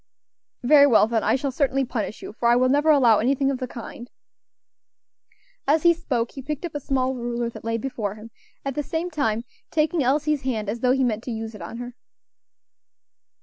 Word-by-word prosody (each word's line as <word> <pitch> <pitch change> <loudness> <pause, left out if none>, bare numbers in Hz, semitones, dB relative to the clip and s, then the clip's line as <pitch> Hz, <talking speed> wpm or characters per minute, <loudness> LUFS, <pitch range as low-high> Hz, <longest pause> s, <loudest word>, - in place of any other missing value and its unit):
"Very 285 +2 +7
well, 230 -5 +5
then, 225 0 0
I - - +3
shall 270 +1 -2
certainly 270 0 +1
punish 225 -3 -4
you, - - -7
for 235 +1 -1
I 240 - +5
will 255 +1 +3
never 290 +3 +3
allow 245 -8 +5
anything 270 +3 +1
of 265 - -3
the 255 - -3
kind." 240 +1 -9 1.6
As 300 +2 +3
he 340 -1 +6
spoke 250 -8 -2
he 270 - -8
picked 300 +4 -4
up 340 - -6
a 290 - -3
small 260 -1 0
ruler 240 -1 -3
that - - -11
lay 230 0 -1
before 220 -4 -4
him, 220 +2 -12 0.3
at 275 - -2
the 295 - -1
same 325 +4 -3
time 230 -7 0 0.3
taking 315 +1 +1
Elsie's 290 +2 +1
hand 225 -6 -2
as 230 +3 -3
though 250 +1 +3
he 265 0 +1
meant 225 -2 -1
to 250 - -4
use 225 0 -5
it 210 - -11
on 170 +7 -7
her. 245 0 -7
255 Hz, 205 wpm, -24 LUFS, 230-285 Hz, 1.6 s, Very